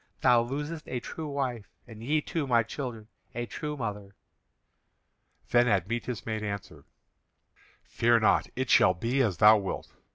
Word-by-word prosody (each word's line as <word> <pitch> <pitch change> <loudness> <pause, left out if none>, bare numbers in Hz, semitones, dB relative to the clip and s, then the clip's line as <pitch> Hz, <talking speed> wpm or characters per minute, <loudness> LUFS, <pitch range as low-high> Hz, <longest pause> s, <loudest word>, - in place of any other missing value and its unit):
Thou 120 -1 +5
losest 150 +6 -5
a 125 - -3
true 160 +5 -7
wife, 130 -7 -3 0.2
and 110 -1 -11
ye, 150 +5 +1
too, 150 -1 -3
my 120 -2 +3
children, 115 -3 -6 0.3
a 120 0 -2
true 150 +4 -5
mother." 105 -4 -5 1.4
Then 120 0 +4
Admetus 115 +4 -1
made 110 -1 -3
answer: 100 -2 -6 1.0
"Fear 115 0 +2
not, 110 - +3
it 130 -1 -2
shall 90 - +5
be 120 +9 0
as 105 -9 0
thou 110 +2 +7
wilt. 95 -2 -5
120 Hz, 150 wpm, -28 LUFS, 110-130 Hz, 1.4 s, thou